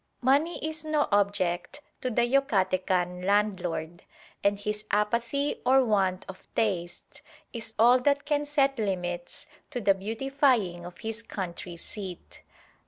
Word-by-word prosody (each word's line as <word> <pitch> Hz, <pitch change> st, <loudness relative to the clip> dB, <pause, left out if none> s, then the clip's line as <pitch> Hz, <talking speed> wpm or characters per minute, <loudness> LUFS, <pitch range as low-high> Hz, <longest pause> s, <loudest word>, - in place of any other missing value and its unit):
Money 285 Hz, +7 st, +3 dB
is 315 Hz, -1 st, -4 dB
no 310 Hz, -1 st, +1 dB
object 200 Hz, +3 st, +1 dB, 0.2 s
to 255 Hz, -, -1 dB
the 240 Hz, 0 st, +2 dB
Yucatecan 185 Hz, -8 st, +1 dB
landlord; 180 Hz, -5 st, 0 dB, 0.4 s
and 200 Hz, 0 st, +3 dB
his 210 Hz, +1 st, -3 dB
apathy 235 Hz, +7 st, 0 dB
or 260 Hz, +1 st, +5 dB
want 190 Hz, -4 st, +1 dB
of 190 Hz, -, -9 dB
taste 175 Hz, -5 st, -2 dB, 0.3 s
is 225 Hz, -2 st, -5 dB
all 240 Hz, +3 st, +6 dB
that 285 Hz, +2 st, +1 dB
can 295 Hz, -1 st, +1 dB
set 275 Hz, -3 st, +1 dB
limits 175 Hz, -4 st, -3 dB, 0.2 s
to 255 Hz, -, -3 dB
the 200 Hz, -3 st, +4 dB
beautifying 225 Hz, -3 st, 0 dB
of 180 Hz, -, -12 dB
his 225 Hz, +1 st, -4 dB
country 180 Hz, -5 st, -6 dB
seat. 185 Hz, 0 st, -8 dB
210 Hz, 130 wpm, -28 LUFS, 185-260 Hz, 0.4 s, all